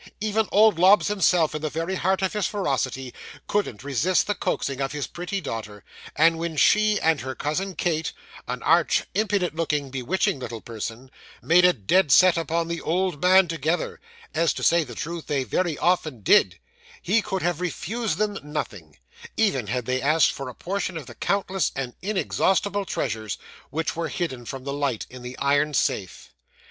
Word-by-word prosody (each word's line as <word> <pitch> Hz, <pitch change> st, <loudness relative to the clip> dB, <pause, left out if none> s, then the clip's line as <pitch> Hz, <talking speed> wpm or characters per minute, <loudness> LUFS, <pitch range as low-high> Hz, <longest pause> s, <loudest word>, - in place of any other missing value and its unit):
Even 215 Hz, 0 st, 0 dB
old 210 Hz, -4 st, +5 dB
Lobbs 195 Hz, +4 st, +6 dB
himself, 180 Hz, -6 st, +2 dB
in 155 Hz, -, -4 dB
the 155 Hz, -, -2 dB
very 165 Hz, +5 st, -3 dB
height 190 Hz, +1 st, 0 dB
of 190 Hz, -, 0 dB
his 210 Hz, -2 st, 0 dB
ferocity, 130 Hz, -, -2 dB, 0.3 s
couldn't 200 Hz, -, -2 dB
resist 145 Hz, +7 st, +1 dB
the 205 Hz, -, 0 dB
coaxing 140 Hz, -8 st, -2 dB
of 135 Hz, +1 st, -2 dB
his 145 Hz, -2 st, -2 dB
pretty 180 Hz, +3 st, -4 dB
daughter; 105 Hz, -, -6 dB, 0.3 s
and 165 Hz, +1 st, +4 dB
when 165 Hz, -2 st, -3 dB
she, 215 Hz, +6 st, +4 dB
and 160 Hz, -2 st, +2 dB
her 130 Hz, +1 st, -5 dB
cousin 180 Hz, +6 st, -2 dB
Kate 160 Hz, -2 st, -1 dB, 0.4 s
an -, -, -4 dB
arch, -, -, +3 dB
impudent 200 Hz, -5 st, 0 dB
looking, 150 Hz, -4 st, -1 dB
bewitching 160 Hz, -, 0 dB
little 120 Hz, -3 st, -6 dB
person 115 Hz, +3 st, -7 dB, 0.3 s
made 175 Hz, +2 st, +5 dB
a 180 Hz, -, +7 dB
dead 150 Hz, -, +2 dB
set 185 Hz, +6 st, +7 dB
upon 165 Hz, 0 st, -1 dB
the 170 Hz, 0 st, -4 dB
old 180 Hz, -2 st, -1 dB
man 185 Hz, 0 st, +6 dB
together, 165 Hz, +1 st, -2 dB, 0.3 s
as, 165 Hz, -2 st, +2 dB
to -, -, -5 dB
say 170 Hz, -1 st, +4 dB
the 120 Hz, -5 st, -10 dB
truth, 165 Hz, +4 st, -5 dB
they 140 Hz, -2 st, 0 dB
very 165 Hz, +3 st, -1 dB
often 155 Hz, -9 st, 0 dB
did, 95 Hz, -2 st, +4 dB, 0.5 s
he 215 Hz, +6 st, +3 dB
could 190 Hz, -3 st, -3 dB
have 175 Hz, -1 st, -1 dB
refused 210 Hz, +2 st, -2 dB
them 205 Hz, -1 st, -1 dB
nothing, 120 Hz, -, -6 dB, 0.4 s
even 165 Hz, -, +1 dB
had 125 Hz, +2 st, -2 dB
they 130 Hz, +1 st, -1 dB
asked 150 Hz, +2 st, +4 dB
for 135 Hz, -2 st, -6 dB
a -, -, -10 dB
portion 185 Hz, -1 st, -3 dB
of 155 Hz, -, -7 dB
the 120 Hz, -, -11 dB
countless 190 Hz, -, -1 dB
and 130 Hz, -3 st, -4 dB
inexhaustible 200 Hz, 0 st, 0 dB
treasures, 110 Hz, -, -3 dB, 0.3 s
which 160 Hz, +1 st, -2 dB
were 165 Hz, 0 st, -2 dB
hidden 130 Hz, -8 st, -4 dB
from 130 Hz, +3 st, -7 dB
the 140 Hz, 0 st, -4 dB
light, 140 Hz, -6 st, -1 dB
in 130 Hz, 0 st, -10 dB
the 125 Hz, +1 st, -8 dB
iron 145 Hz, +1 st, +1 dB
safe. 95 Hz, -7 st, -2 dB
165 Hz, 180 wpm, -24 LUFS, 135-190 Hz, 0.5 s, a